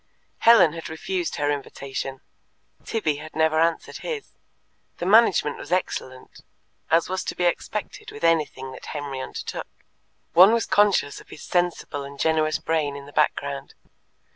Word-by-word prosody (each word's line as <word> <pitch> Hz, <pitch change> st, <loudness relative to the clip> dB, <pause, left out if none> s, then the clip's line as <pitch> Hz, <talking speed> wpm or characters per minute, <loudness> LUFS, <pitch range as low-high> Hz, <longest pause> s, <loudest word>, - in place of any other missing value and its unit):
Helen 195 Hz, -9 st, +6 dB
had 165 Hz, -1 st, -7 dB
refused 175 Hz, +2 st, -3 dB
her 145 Hz, 0 st, 0 dB
invitation; 135 Hz, -1 st, -5 dB, 0.6 s
Tibby 155 Hz, -10 st, -1 dB
had 155 Hz, +1 st, -10 dB
never 160 Hz, 0 st, +3 dB
answered 165 Hz, 0 st, 0 dB
his. 455 Hz, -4 st, -5 dB, 0.7 s
The 175 Hz, -, -4 dB
management 195 Hz, -7 st, +4 dB
was -, -, -10 dB
excellent, 130 Hz, -8 st, -3 dB, 0.5 s
as 165 Hz, +1 st, +3 dB
was 185 Hz, 0 st, -2 dB
to -, -, -3 dB
be 180 Hz, -, -2 dB
expected 215 Hz, -, -2 dB
with 430 Hz, -, -11 dB
anything 150 Hz, -5 st, +1 dB
that -, -, -11 dB
Henry 140 Hz, -2 st, -5 dB
undertook; -, -, -6 dB, 0.7 s
one 190 Hz, +5 st, +8 dB
was 230 Hz, -2 st, +1 dB
conscious 200 Hz, -8 st, +2 dB
of -, -, -20 dB
his -, -, -11 dB
sensible 175 Hz, -5 st, -1 dB
and 140 Hz, 0 st, -10 dB
generous 155 Hz, -1 st, +2 dB
brain 155 Hz, -3 st, -1 dB
in 140 Hz, 0 st, -8 dB
the 145 Hz, -, -14 dB
background. 140 Hz, -2 st, -1 dB
160 Hz, 150 wpm, -24 LUFS, 145-185 Hz, 0.7 s, one